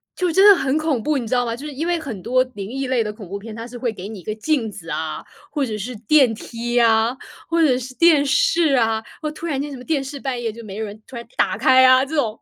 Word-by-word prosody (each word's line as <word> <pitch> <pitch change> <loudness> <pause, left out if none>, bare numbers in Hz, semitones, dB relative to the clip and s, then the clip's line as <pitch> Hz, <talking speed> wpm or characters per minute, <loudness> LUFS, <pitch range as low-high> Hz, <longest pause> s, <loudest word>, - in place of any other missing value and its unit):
就 360 -2 0
真 385 +4 +6
的 400 - +9
很 275 -2 0
恐 310 -6 0
怖， 300 +3 0
你 235 -4 -4
知 255 - -2
道 245 0 +2
吗？ 230 -1 -2
就 280 +5 -9
是 295 - -6
因 295 +5 -3
为 345 -1 +1
很 235 - -7
多 255 +4 +2
灵 200 0 -6
异 270 +2 -3
类 250 -3 +1
的 210 - -4
恐 210 -4 -11
怖 200 +3 -5
片， 215 +1 -9
它 230 +1 -7
是 245 0 -9
会 240 -1 -1
给 195 -3 -8
你 215 -2 -8
一 - - -14
个 215 - -3
镜 225 -1 -1
子 170 -5 -11
啊， 155 +1 -4 0.3
或 290 -3 0
者 215 -3 -4
是 240 +5 -5
电 245 +2 +3
梯 240 +2 -3
啊， 230 +2 +3 0.3
或 335 0 +2
者 260 -6 +4
是 255 0 -7
电 315 -3 +5
视 340 - +3
啊。 225 -2 +1 0.2
哦， 305 -1 -3
突 310 - -8
然 280 -5 -1
间 290 0 -5
什 270 - -7
么 250 - -11
电 285 -1 -1
视 280 +1 -7
半 260 -3 -3
夜 230 -2 -2
就 230 +2 -11
没 200 -3 -8
有 220 - -3
人 210 +1 -10
突 260 - -11
然 235 - -7
打 - - +1
开 260 0 +5
啊 255 +1 +6
这 315 +3 -6
种， 230 -7 +1
就 - - -34
250 Hz, 325 characters per minute, -21 LUFS, 220-285 Hz, 0.3 s, 的